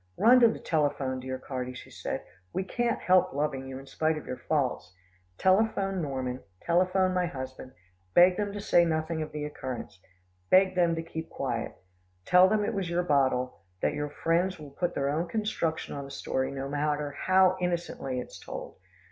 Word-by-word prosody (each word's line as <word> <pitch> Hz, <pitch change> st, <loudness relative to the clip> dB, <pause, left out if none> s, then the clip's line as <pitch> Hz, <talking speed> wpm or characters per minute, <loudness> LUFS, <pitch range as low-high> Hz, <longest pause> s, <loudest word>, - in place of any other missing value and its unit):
"Run 250 Hz, +3 st, +7 dB
to 235 Hz, -, +7 dB
the 225 Hz, -, -1 dB
telephone, 145 Hz, -5 st, 0 dB
dear 130 Hz, 0 st, -4 dB
Carty," 125 Hz, -1 st, -5 dB
she -, -, -11 dB
said, -, -, -4 dB, 0.3 s
"we 190 Hz, -, -1 dB
can't 235 Hz, +4 st, -1 dB
help 185 Hz, -3 st, +3 dB
loving 135 Hz, -2 st, -2 dB
you, 130 Hz, 0 st, -6 dB
in 135 Hz, -, -10 dB
spite 155 Hz, +3 st, 0 dB
of 155 Hz, -, -7 dB
your 125 Hz, -, -6 dB
faults. 135 Hz, -, 0 dB, 0.4 s
Telephone 195 Hz, -1 st, +2 dB
Norman, 130 Hz, -4 st, -3 dB, 0.2 s
telephone 185 Hz, +2 st, +2 dB
my 180 Hz, -1 st, +1 dB
husband 130 Hz, -2 st, -7 dB, 0.4 s
beg 180 Hz, +1 st, +7 dB
them 205 Hz, 0 st, -2 dB
to 205 Hz, -, -5 dB
say 175 Hz, -3 st, +4 dB
nothing 160 Hz, 0 st, -1 dB
of 155 Hz, -, -4 dB
the 150 Hz, -1 st, -4 dB
occurrence. 130 Hz, -9 st, -6 dB, 0.5 s
Beg 190 Hz, 0 st, +5 dB
them 175 Hz, -2 st, +3 dB
to 165 Hz, -, -3 dB
keep 160 Hz, 0 st, -6 dB
quiet. 125 Hz, -4 st, -3 dB, 0.5 s
Tell 180 Hz, +1 st, +7 dB
them 210 Hz, 0 st, +2 dB
it 230 Hz, -, -1 dB
was 195 Hz, -4 st, -2 dB
your 175 Hz, +1 st, +1 dB
bottle, 130 Hz, -, +1 dB, 0.2 s
that -, -, +2 dB
your 150 Hz, 0 st, -3 dB
friends 170 Hz, +5 st, 0 dB
will 150 Hz, -2 st, -10 dB
put 175 Hz, +4 st, -2 dB
their 140 Hz, 0 st, 0 dB
own 165 Hz, +4 st, -1 dB
construction 210 Hz, -6 st, -2 dB
on 140 Hz, -1 st, -5 dB
the -, -, -10 dB
story, 130 Hz, -1 st, -2 dB
no 135 Hz, 0 st, -4 dB
matter 145 Hz, 0 st, -1 dB
how 185 Hz, +4 st, +4 dB
innocently 170 Hz, -7 st, -2 dB
it 125 Hz, -, -6 dB
is -, -, -11 dB
told. -, -, -8 dB
160 Hz, 190 wpm, -29 LUFS, 135-185 Hz, 0.5 s, Run